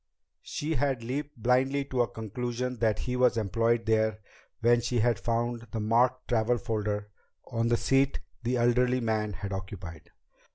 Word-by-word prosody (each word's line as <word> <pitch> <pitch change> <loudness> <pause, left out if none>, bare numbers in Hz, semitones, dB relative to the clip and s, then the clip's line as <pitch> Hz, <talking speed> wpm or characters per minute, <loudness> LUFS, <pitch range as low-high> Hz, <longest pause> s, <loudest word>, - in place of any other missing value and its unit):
She 155 +2 -3
had 135 -5 0
leaped 140 +4 -4
blindly 130 +4 +2
to 130 -2 0
a 120 - +2
conclusion 120 +3 -4
that 110 -2 +2
he 125 - -3
was 125 -1 +3
employed 115 +2 +1
there 110 -1 +2 0.4
when 120 +1 +4
she 120 +1 -1
had 120 -1 +2
found 120 0 -1
the 115 - -3
marked 120 +4 +2
travel 120 0 +2
folder 105 -3 -2 0.4
on 115 0 +1
the 120 0 +3
seat 135 +2 +2 0.2
the 125 +1 0
elderly 125 +1 +3
man 110 -3 -1
had 100 +1 -5
occupied. 95 -5 -7
120 Hz, 160 wpm, -29 LUFS, 110-125 Hz, 0.4 s, when